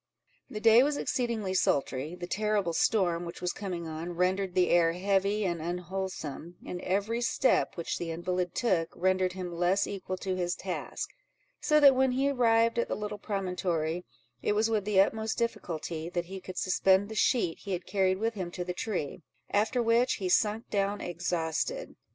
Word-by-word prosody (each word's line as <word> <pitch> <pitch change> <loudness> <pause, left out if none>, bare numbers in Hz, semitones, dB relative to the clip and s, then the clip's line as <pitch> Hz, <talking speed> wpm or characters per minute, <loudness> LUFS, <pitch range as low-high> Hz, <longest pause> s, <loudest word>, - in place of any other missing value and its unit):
The 210 - -5
day 225 +2 +7
was 290 +2 +1
exceedingly 230 -6 -1
sultry; 140 -2 0
the 180 0 -6
terrible 205 -2 0
storm 175 -3 +2
which 170 0 -7
was 180 0 -2
coming 180 -5 -5
on, 160 +2 -5
rendered 185 +1 0
the 180 -1 +3
air 165 -1 +4
heavy 200 +3 +1
and 170 -3 -1
unwholesome, 175 -2 -4
and 180 - -5
every 205 +5 -1
step 240 -2 +2
which 170 - -3
the 170 - -4
invalid 180 +2 -2
took, 175 -9 +1
rendered 185 0 +1
him 180 -2 -5
less 180 +3 +2
equal 185 -1 -5
to 185 0 -2
his 175 -1 -1
task; - - -5 0.5
so 300 -1 +3
that 280 -2 +8
when 260 0 +2
he 275 +2 +2
arrived 230 -2 +3
at - - +1
the - - -2
little 210 0 -5
promontory, 180 -5 -2 0.4
it - - +1
was 220 +2 +1
with 210 -3 0
the 205 -2 +3
utmost 220 +3 +2
difficulty 170 -8 -3
that 175 -1 -2
he 190 +2 -8
could 185 0 -9
suspend 190 +1 +3
the 220 - -7
sheet 215 -5 +1
he 195 - -5
had 180 -1 -3
carried 190 -2 +1
with 225 +3 -1
him 185 -5 -4
to 180 +1 -4
the 180 0 -4
tree; 180 -5 -3 0.3
after 220 +4 +2
which, 235 +3 +3
he 190 - -3
sunk 215 +4 +2
down 200 0 0
exhausted. 175 - -2
190 Hz, 180 wpm, -29 LUFS, 175-215 Hz, 0.5 s, that